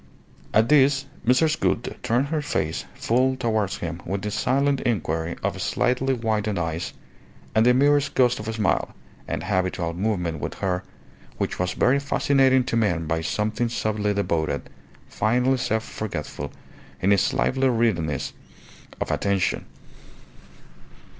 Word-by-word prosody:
At 110 +2 +4
this 140 -1 +4 0.2
Mrs. 155 +5 +3
Gould 120 - 0
turned 125 +5 +1
her 155 -1 0
face 80 - -2
full 130 +3 +2
towards 110 -6 0
him 85 0 -5
with 95 +2 -3
the 105 - -2
silent 140 +5 +1
inquiry 85 -8 -1
of - - -2
slightly 130 +2 +1
widened 110 -3 -1
eyes 85 0 -2 0.6
and 110 +2 +4
the 125 - +6
merest 145 +1 +3
ghost 125 -1 +3
of 105 - -6
a 110 - -2
smile, 110 -3 0 0.3
an - - -3
habitual 90 -2 -1
movement 90 -4 -1
with - - -4
her, 90 -1 -1 0.5
which - - -2
was 90 0 0
very 135 +3 +3
fascinating 135 -2 +3
to 120 - -2
men 90 -8 +1
by 80 +1 -1
something 110 +7 -1
subtly 105 -2 -1
devoted, 85 -6 -1 0.4
finely 125 +4 +1
self 110 -2 0
forgetful 100 -12 -5 0.5
in 95 - +2
its 100 - +2
lively 135 0 +1
readiness 95 - 0 0.7
of - - -2
attention. 100 -3 0
110 Hz, 140 wpm, -24 LUFS, 90-130 Hz, 0.7 s, the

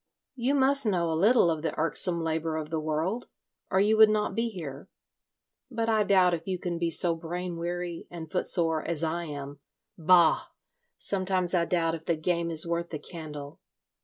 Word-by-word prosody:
"You 265 +2 0
must 275 -2 +3
know 175 -5 0
a - - 0
little 195 +2 +4
of 160 -1 -3
the 160 - -3
irksome 170 +1 +2
labour 160 0 -2
of 155 0 -6
the 160 - -1
world, 160 +9 -2 0.4
or 190 - +2
you 210 +2 +3
would 220 0 +8
not 215 0 0
be 230 +1 -1
here. 150 -9 -8 0.8
But 230 -2 -2
I 220 -1 +3
doubt 185 -3 +3
if 165 +1 -4
you 185 -1 -1
can 175 -1 -4
be 170 -1 0
so 170 +1 +3
brain 175 +2 -5
weary 175 0 -5
and 165 -2 -9
footsore 165 -3 0
as 165 -2 -1
I 170 +2 -2
am.... 145 -2 -7 0.4
Bah! 170 0 +4 0.5
Sometimes 185 -2 +2
I 170 -2 +2
doubt 165 -2 0
if 160 -1 -7
the 170 - +1
game 170 +1 -1
is 160 -1 0
worth 170 0 -2
the 155 - -4
candle. 150 -2 -9
170 Hz, 190 wpm, -27 LUFS, 160-185 Hz, 0.8 s, would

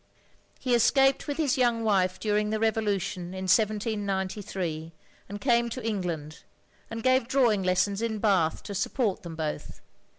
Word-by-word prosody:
He 255 -2 0
escaped 270 +3 +3
with 290 -1 -3
his 285 -5 +1
young 240 -2 +2
wife 190 -4 +1
during 210 0 0
the 215 0 -1
Revolution 200 -5 -1
in 190 - -5
1793, 195 -5 -1 0.4
and 205 +1 -6
came 235 0 +2
to 235 0 -5
England; 170 -8 -3 0.5
and 225 0 -6
gave 255 -2 +3
drawing 245 -6 +3
lessons 190 +3 +1
in 230 -2 -1
Bath 190 -7 +1
to 205 - -6
support 205 +1 -1
them 170 -4 -8
both. 155 -2 -5
210 Hz, 145 wpm, -27 LUFS, 185-230 Hz, 0.5 s, escaped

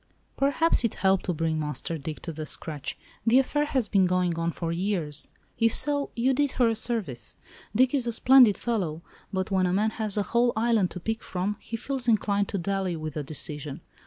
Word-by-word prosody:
"Perhaps 285 +2 +3
it 230 - 0
helped 190 -1 +2
to 180 - 0
bring 160 0 -1
Master 150 +2 -3
Dick 150 +2 -6
to 170 - -4
the 155 0 -6
scratch—the 165 - -2
affair 295 +3 +2
has 260 -6 0
been 190 -3 +3
going 180 -1 +1
on 165 0 0
for 165 0 -4
years; 170 -5 -1 0.3
if 230 -1 +3
so, 285 -1 +1
you 255 +3 +2
did 285 +1 +1
her 240 -2 +3
a 225 - 0
service. 215 - -3 0.4
Dick 255 +3 +4
is 260 -4 +1
a - - +1
splendid 245 -2 +6
fellow, 175 -9 -2 0.3
but 190 0 -2
when 185 -1 +2
a 180 - 0
man 215 +3 +2
has 215 -2 -3
a 205 - +2
whole 240 +3 +2
island 220 -4 +2
to 180 - -7
pick 225 +6 -3
from 190 +3 -2
he 230 - -5
feels 265 +1 -3
inclined 205 -3 +2
to 200 - -3
dally 190 0 -1
with 155 -2 -5
a 150 - -2
decision. 145 0 -5
200 Hz, 205 wpm, -27 LUFS, 170-235 Hz, 0.4 s, splendid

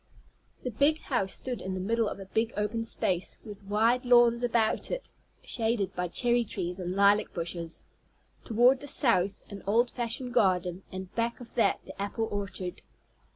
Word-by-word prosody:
The 250 - -2
big 285 +8 +3
house 220 -11 -1
stood 250 -2 -4
in 190 0 -3
the - - -3
middle 225 +3 +1
of - - -7
a 195 - -7
big 225 +4 -1
open 210 +2 -1
space, 185 -5 -2
with 205 -2 -9
wide 225 +5 +2
lawns 240 -1 +5
about 230 -2 +1
it - - -4 0.3
shaded 225 -5 -1
by 180 0 -1
cherry 240 +6 +2
trees 180 -4 -4
and 180 0 -3
lilac 200 +1 +4
bushes, 170 -1 -4 0.6
toward 245 +3 +4
the 285 - -9
south 200 -8 +2
an 200 -1 -7
old 235 +4 +3
fashioned 245 +1 -3
garden, 180 -2 +2
and 185 -1 -7
back 235 0 -1
of 245 - -12
that 230 - +2
the - - -9
apple 220 +3 -2
orchard. 195 -3 -4
220 Hz, 170 wpm, -29 LUFS, 190-240 Hz, 0.6 s, lawns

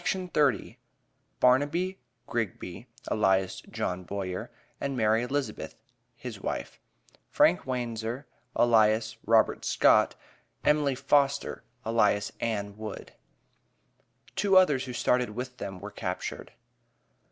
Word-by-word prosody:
BARNABY 145 +9 +2 0.3
GRIGBY, 110 -2 -4 0.2
ALIAS 95 -2 +2
JOHN 90 0 -3
BOYER, 95 -1 -4 0.3
AND 135 -2 -2
MARY 110 0 +3
ELIZABETH, 135 +3 -3 0.4
HIS - - -8
WIFE; 60 - -4 0.5
FRANK - - +3
WANZER, 120 +1 -3 0.3
ALIAS 110 -1 +3
ROBERT - - +3
SCOTT; - - +4 0.5
EMILY 150 -2 +3
FOSTER, 140 +1 +1 0.2
ALIAS 105 -2 +2
ANN 100 -3 -2
WOOD. 110 -1 -7 1.2
(TWO 195 -2 +4
OTHERS 150 -8 +4
WHO 125 - -6
STARTED 125 0 +1
WITH 125 +1 -5
THEM 95 -2 -6
WERE 105 +3 -8
CAPTURED.) 90 -3 -5
115 Hz, 95 wpm, -28 LUFS, 105-135 Hz, 1.2 s, SCOTT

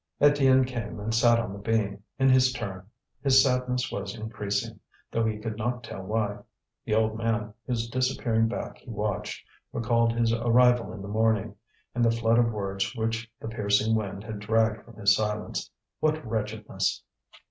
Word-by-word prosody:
Étienne 135 -3 +5
came 120 -4 -5
and 110 +2 -3
sat 120 0 +5
on 105 -4 -2
the 100 - -8
beam, 100 -2 0 0.2
in 135 -1 +3
his 130 -1 +5
turn. 100 -7 -6 0.3
His 135 -1 +6
sadness 125 -1 0
was 100 +1 -4
increasing, 105 -2 -3 0.3
though 115 - +1
he 110 -1 0
could 105 0 -5
not 120 +2 -2
tell 115 - -7
why. 105 +1 -1 0.5
The 110 - +1
old 110 0 +2
man, 115 -2 -1
whose 115 -2 -1
disappearing 120 -2 +1
back 115 - -5
he - - -15
watched, 105 -3 -3 0.3
recalled 115 0 +2
his 115 -1 +2
arrival 120 +1 +4
in 100 - -8
the - - -6
morning, 110 -1 +1 0.4
and 120 - +1
the 115 - +5
flood 115 0 +3
of 115 -1 +3
words 100 +2 -2
which 115 0 -2
the - - -6
piercing 105 0 +1
wind 100 -2 -2
had 110 -1 -6
dragged 110 0 +1
from 115 - -15
his 100 -2 +4
silence. 105 0 -2 0.3
What 155 -1 0
wretchedness! 105 -3 -2
115 Hz, 170 wpm, -27 LUFS, 105-120 Hz, 0.5 s, His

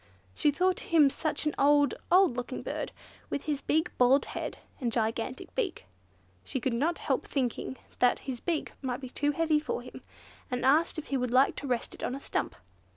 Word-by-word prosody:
She 295 - +2
thought 365 +5 +2
him 305 -5 +6
such 310 +1 -2
an 300 - +1
old, 290 0 +5 0.2
old 365 -7 +6
looking 250 +1 -4
bird, - - -3 0.4
with 285 - -2
his 295 -3 -2
big 315 +3 +1
bald 255 +3 +5
head, - - -5 0.2
and 240 -3 -1
gigantic 225 +2 -2
beak. 405 -9 -2 0.6
She 265 - -3
could 250 +1 -1
not 305 +9 +1
help - - -1
thinking 260 -1 -2 0.2
that 250 -1 +4
his 255 -3 -4
beak 330 +2 -2
must 255 -1 -3
be 255 -2 -7
too 290 +2 0
heavy 315 0 +2
for 295 -5 -3
him, 250 - -10 0.5
and 250 0 -1
asked 310 +6 +4
if 315 - -6
he - - +3
would 250 -1 -1
like 255 +3 +4
to 285 - -5
rest 245 -2 -1
it - - -11
on - - -2
the 275 - -4
stump. - - -2
275 Hz, 200 wpm, -30 LUFS, 250-310 Hz, 0.6 s, him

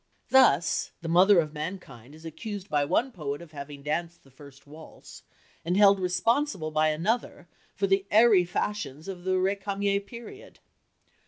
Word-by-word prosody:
Thus 215 - +3
the - - -5
mother 180 +3 +5
of 155 -2 -2
mankind 150 - -8
is 160 +1 -15
accused 200 +5 -7
by 145 -1 +1
one 235 - 0
poet 145 - -5
of 170 -2 -13
having 140 -1 -9
danced 170 +3 -4
the 135 - -22
first 135 0 -16
waltz, 155 +2 -14 0.4
and 175 +3 -1
held 200 -1 +6
responsible 185 - 0
by 155 0 +2
another 175 +4 -2 0.3
for 200 - 0
the 195 0 +1
airy 215 -3 +5
fashions 175 -4 -4
of 185 -2 -8
the 185 - 0
Récamier 200 +1 -1
period. 235 - -12
180 Hz, 155 wpm, -27 LUFS, 155-200 Hz, 0.4 s, held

